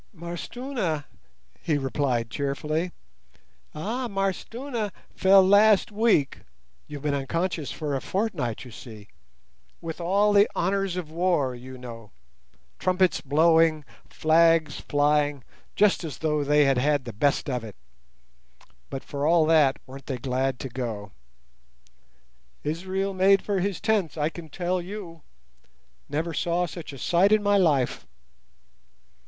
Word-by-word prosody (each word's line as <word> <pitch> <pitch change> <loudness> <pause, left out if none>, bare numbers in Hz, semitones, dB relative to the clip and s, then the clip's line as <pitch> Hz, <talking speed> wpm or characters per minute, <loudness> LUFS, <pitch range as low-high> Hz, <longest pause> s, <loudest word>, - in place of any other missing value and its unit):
"M'Arstuna," 175 - -4 0.6
he 155 -3 0
replied 130 -4 -1
cheerfully. 150 +6 -2 0.8
"Ah, 230 +11 -3
M'Arstuna 215 +4 -3 0.2
fell 190 0 +6
last 205 +1 +5
week—you've 140 - -2
been 150 -1 0
unconscious 160 +3 -2
for 150 -3 -4
a 135 - -2
fortnight, 170 - -2
you 125 - -11
see—with 105 - -12
all 200 +4 +2
the 205 0 +5
honours 195 0 0
of 165 -4 -5
war, 165 -6 +1
you 130 +1 -10
know—trumpets 120 - -4
blowing, 160 +1 +3 0.2
flags 165 0 +3
flying, 145 -1 +2 0.3
just 205 -3 +3
as 155 -4 -6
though 150 -2 0
they 150 +1 +4
had 135 -2 +2
had 145 0 +1
the 120 - -6
best 140 +9 +1
of 125 -4 -2
it; 110 -3 -9 1.1
but 135 - -6
for 145 +1 -3
all 165 -1 +4
that, 155 -4 +4
weren't 135 +1 -12
they 130 - -3
glad 130 +1 -1
to 135 - -5
go. 115 -5 -5 1.5
Israel 190 +5 -2
made 195 +1 +4
for 200 -2 -1
his 195 0 -2
tents, 205 -8 0
I 150 0 +1
can 165 -1 -10
tell 180 +3 -2
you—never 165 - -9
saw 175 +3 0
such 170 -2 -8
a 140 - -10
sight 180 +9 +3
in 215 -1 +4
my 205 0 +3
life." 145 -9 +1
155 Hz, 125 wpm, -25 LUFS, 135-185 Hz, 1.5 s, fell